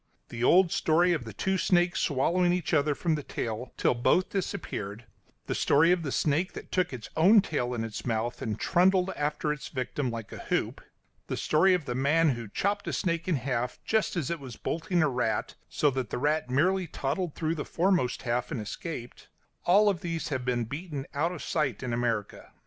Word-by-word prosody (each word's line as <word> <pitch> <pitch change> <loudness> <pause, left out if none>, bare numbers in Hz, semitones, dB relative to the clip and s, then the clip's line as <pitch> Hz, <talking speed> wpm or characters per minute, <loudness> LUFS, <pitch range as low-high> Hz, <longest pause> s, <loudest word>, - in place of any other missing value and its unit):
The 115 0 -5
old 180 +5 +5
story 175 +3 +3
of 150 -8 -2
the 110 - -7
two 190 - 0
snakes 175 -1 +2
swallowing 175 +5 +2
each 175 -2 -1
other 145 -1 +3
from 165 +1 0
the 150 - -1
tail 115 -2 -4
till - - +3
both 125 +9 +2
disappeared; 115 - -4 0.4
the - - -2
story 160 +5 +4
of 180 -1 +2
the 145 -4 -3
snake 155 +8 +1
that - - -9
took 185 -1 +1
its 125 -4 -8
own 195 +7 +7
tail 125 -9 -1
in 115 - -2
its 110 -2 -5
mouth 120 +1 -2
and 110 -1 -3
trundled 185 +1 +3
after 150 0 -1
its 150 - -8
victim 130 0 -3
like 115 -2 -6
a - - -8
hoop; - - -2 0.5
the - - -3
story 180 +5 +4
of 170 -5 -3
the 125 - -3
man 150 +6 +3
who 120 -4 -3
chopped 200 - -1
a - - -2
snake 170 -2 -1
in 180 - +2
half 125 -2 -2
just 220 -3 +1
as 170 -4 -1
it 170 - -2
was 130 -4 -9
bolting 170 - -1
a - - +3
rat, 125 -5 -1 0.2
so 145 - +2
that 130 -4 -3
the - - -3
rat 150 +1 0
merely 180 +8 +2
toddled 150 +4 -3
through 160 0 -1
the 155 -3 -3
foremost 175 -8 0
half 120 0 -1
and - - -3
escaped 120 +4 -7 0.4
all 205 +3 +5
these 165 -2 -4
have 130 -4 -2
been 120 -1 0
beaten 145 +2 -5
out 155 +4 0
of 180 - -7
sight 135 -8 -1
in 125 -2 -2
America. 115 -3 -2
150 Hz, 205 wpm, -28 LUFS, 125-175 Hz, 0.5 s, own